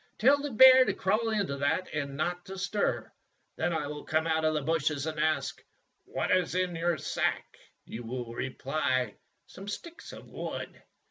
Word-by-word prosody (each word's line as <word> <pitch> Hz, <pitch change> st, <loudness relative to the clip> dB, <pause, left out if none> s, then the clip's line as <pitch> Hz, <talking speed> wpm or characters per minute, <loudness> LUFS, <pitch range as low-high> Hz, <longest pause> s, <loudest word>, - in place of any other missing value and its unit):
Tell 275 Hz, +6 st, +5 dB
the 290 Hz, -, -3 dB
bear 260 Hz, +2 st, +9 dB
to 195 Hz, -, -1 dB
crawl 215 Hz, +4 st, +1 dB
into 200 Hz, -10 st, -1 dB
that 155 Hz, +6 st, 0 dB
and 140 Hz, -2 st, -3 dB
not 175 Hz, +3 st, -2 dB
to 195 Hz, 0 st, -8 dB
stir. 200 Hz, +2 st, -1 dB, 0.4 s
Then -, -, 0 dB
I 160 Hz, -3 st, -1 dB
will 150 Hz, 0 st, -6 dB
come 160 Hz, +1 st, 0 dB
out 160 Hz, -1 st, +1 dB
of 155 Hz, 0 st, +2 dB
the 150 Hz, -, -1 dB
bushes 155 Hz, -2 st, 0 dB
and 155 Hz, -1 st, -4 dB
ask, 150 Hz, -3 st, 0 dB, 0.4 s
'What -, -, -2 dB
is 180 Hz, -2 st, +2 dB
in 185 Hz, -1 st, 0 dB
that 170 Hz, -2 st, -1 dB
sack?' -, -, -1 dB, 0.3 s
"You 120 Hz, -, -7 dB
will 120 Hz, 0 st, -5 dB
reply, 130 Hz, -2 st, -1 dB, 0.3 s
'Some 195 Hz, +2 st, -11 dB
sticks 330 Hz, +11 st, -7 dB
of -, -, -11 dB
wood. -, -, -6 dB
160 Hz, 180 wpm, -29 LUFS, 145-195 Hz, 0.4 s, bear